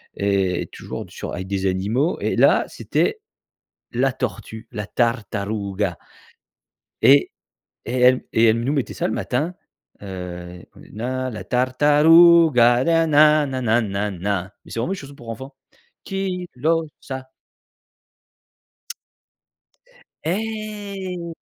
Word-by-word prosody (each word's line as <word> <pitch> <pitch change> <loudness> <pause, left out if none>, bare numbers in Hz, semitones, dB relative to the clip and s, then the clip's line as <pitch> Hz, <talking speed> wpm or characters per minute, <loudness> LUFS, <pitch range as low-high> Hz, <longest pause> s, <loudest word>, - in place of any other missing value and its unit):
et 95 -3 0
toujours - - -7 0.3
avec 95 +1 -5
des 100 0 -2
animaux 105 - 0
et - - 0
là, - - +4
c'était 440 -1 -1 0.7
la 130 +2 +1
tortue, 110 -1 -5
la 105 -3 -4
tartaruga. 105 - -2 1.0
Et 140 +1 +6 0.5
et 120 - -4
elle 125 +1 +5
et 115 - +3
elle 115 +1 +3
nous 135 - 0
mettait 140 -4 -2
ça - - -1
le - - -2
matin. 150 +12 -2 0.5
Heu, 90 -2 -8
come - - -16
la 130 -1 -3
tartaruga, 145 0 +5
na-na 155 -2 +4
na-na 125 -3 +1
na-na 100 -2 -3
mais - - -16
c'est - - -5
vraiment 175 +11 -1
une - - -2
chanson 140 0 -10
pour 120 -4 -14
enfants. 130 +5 -7 0.5
chi 190 -2 -3
lo 160 +4 +1
sa! 130 -1 -7 3.0
Eh! 200 -3 -4
125 Hz, 110 wpm, -22 LUFS, 105-160 Hz, 3.0 s, Et